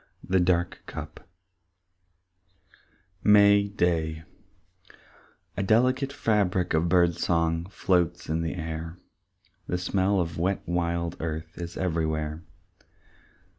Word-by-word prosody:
The 95 Hz, 0 st, +3 dB
Dark 90 Hz, -1 st, +1 dB
Cup -, -, -8 dB, 1.9 s
VI 105 Hz, -, +3 dB
May 100 Hz, 0 st, +6 dB
Day 80 Hz, -5 st, -1 dB, 1.3 s
A -, -, -2 dB
delicate 125 Hz, +7 st, +2 dB
fabric 100 Hz, -9 st, 0 dB
of 80 Hz, +2 st, +2 dB
bird 85 Hz, -1 st, +4 dB
song 85 Hz, 0 st, 0 dB
Floats 90 Hz, -4 st, 0 dB
in 80 Hz, +1 st, -1 dB
the 85 Hz, +1 st, -3 dB
air, 80 Hz, 0 st, -5 dB, 0.7 s
The 90 Hz, -, -1 dB
smell 95 Hz, +2 st, +1 dB
of 85 Hz, -2 st, -2 dB
wet 95 Hz, +3 st, 0 dB
wild 85 Hz, -1 st, -1 dB
earth 80 Hz, 0 st, -5 dB
Is 85 Hz, 0 st, -6 dB
everywhere. 80 Hz, -3 st, -2 dB
85 Hz, 105 wpm, -26 LUFS, 80-95 Hz, 1.9 s, May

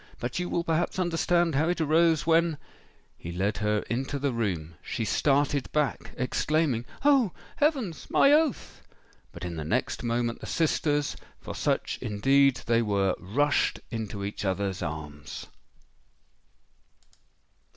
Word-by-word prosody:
But 120 Hz, +6 st, -3 dB
you 180 Hz, -, -2 dB
will 170 Hz, -, 0 dB
perhaps 170 Hz, +2 st, 0 dB
understand 175 Hz, -1 st, +1 dB
how 155 Hz, +5 st, +2 dB
it 175 Hz, -, 0 dB
arose, 160 Hz, 0 st, +3 dB
when——" 165 Hz, -1 st, +3 dB, 0.6 s
He 85 Hz, -, -6 dB
led 95 Hz, +4 st, -1 dB
her 105 Hz, 0 st, +1 dB
into 135 Hz, +4 st, -2 dB
the 140 Hz, 0 st, 0 dB
room:—she 95 Hz, -1 st, -3 dB
started 140 Hz, +3 st, +1 dB
back, 150 Hz, -2 st, 0 dB
exclaiming, 130 Hz, -1 st, 0 dB, 0.2 s
"Oh! 270 Hz, -, +4 dB, 0.2 s
heavens—my 275 Hz, -, +2 dB
oath!"—but 295 Hz, -, -3 dB
in 85 Hz, -2 st, -5 dB
the 80 Hz, -, -3 dB
next 75 Hz, -, -1 dB
moment 120 Hz, 0 st, -1 dB
the -, -, -8 dB
sisters—for 150 Hz, -2 st, -1 dB
such -, -, -1 dB
indeed 135 Hz, +5 st, +3 dB
they 115 Hz, 0 st, +3 dB
were—rushed 105 Hz, +6 st, +1 dB
into 110 Hz, -3 st, -4 dB
each 100 Hz, -, -5 dB
other's 95 Hz, -1 st, -1 dB
arms! 75 Hz, -3 st, -6 dB
135 Hz, 120 wpm, -27 LUFS, 100-165 Hz, 0.6 s, Oh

